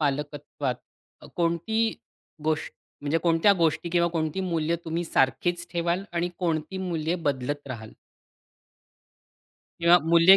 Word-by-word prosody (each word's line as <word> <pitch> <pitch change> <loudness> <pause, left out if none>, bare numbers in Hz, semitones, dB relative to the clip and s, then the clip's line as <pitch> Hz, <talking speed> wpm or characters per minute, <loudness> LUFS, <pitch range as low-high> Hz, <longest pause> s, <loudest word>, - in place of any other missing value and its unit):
पालकत्वात 145 -2 -2 0.5
अ, - - -12
कोणती 175 +7 +1 0.5
गोष्ट 155 0 0 0.3
म्हणजे 145 +3 +1
कोणत्या 170 +4 +5
गोष्टी, 165 +1 +2
किंवा 170 0 +3
कोणती 165 +1 -1
मूल्य 170 -3 0
तुम्ही 165 +2 -2
सारखीच 170 +7 +1
ठेवाल 170 +2 0
आणि 175 +1 0
कोणती 170 +1 -1
मूल्य 170 -3 -1
बदलत 145 +1 -1
राहाल? 110 -3 -7 1.9
किंवा 170 +1 +7
मूल्य, 170 +3 +9
165 Hz, 115 wpm, -27 LUFS, 150-175 Hz, 1.9 s, मूल्य